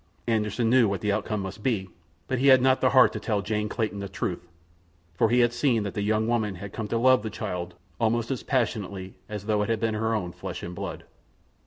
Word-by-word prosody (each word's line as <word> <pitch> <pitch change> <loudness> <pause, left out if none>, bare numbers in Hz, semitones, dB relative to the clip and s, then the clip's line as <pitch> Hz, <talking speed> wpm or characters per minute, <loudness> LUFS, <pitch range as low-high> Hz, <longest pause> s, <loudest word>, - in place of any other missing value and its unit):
Anderssen 110 +1 0
knew 120 -1 +5
what 100 -3 -2
the 105 - +1
outcome 105 0 -1
must 95 +2 -6
be, 105 -6 0 0.4
but 130 - -1
he 135 - +3
had 130 -1 +8
not 130 +1 +3
the 130 - +4
heart 130 -1 +6
to - - -4
tell 105 -3 -1
Jane 105 0 -1
Clayton 110 -3 -2
the 100 -1 -5
truth, 90 -1 -4 0.7
for 95 +6 +2
he 125 +2 +4
had 120 0 +3
seen 120 -3 +1
that 100 - -4
the 105 - -2
young 110 +2 +1
woman 110 -4 0
had 100 +2 -8
come 110 -2 -4
to 115 - -1
love 130 +1 +5
the 110 - -4
child 90 -5 -5 0.2
almost 115 +2 +1
as 130 - -2
passionately 100 -7 -2 0.2
as 105 -2 -6
though 105 -1 +1
it 105 - -1
had 115 -1 +1
been 110 0 0
her 110 +1 0
own 90 -5 -2
flesh - - -7
and 85 - -5
blood. 90 -4 -6
110 Hz, 235 wpm, -26 LUFS, 100-120 Hz, 0.7 s, had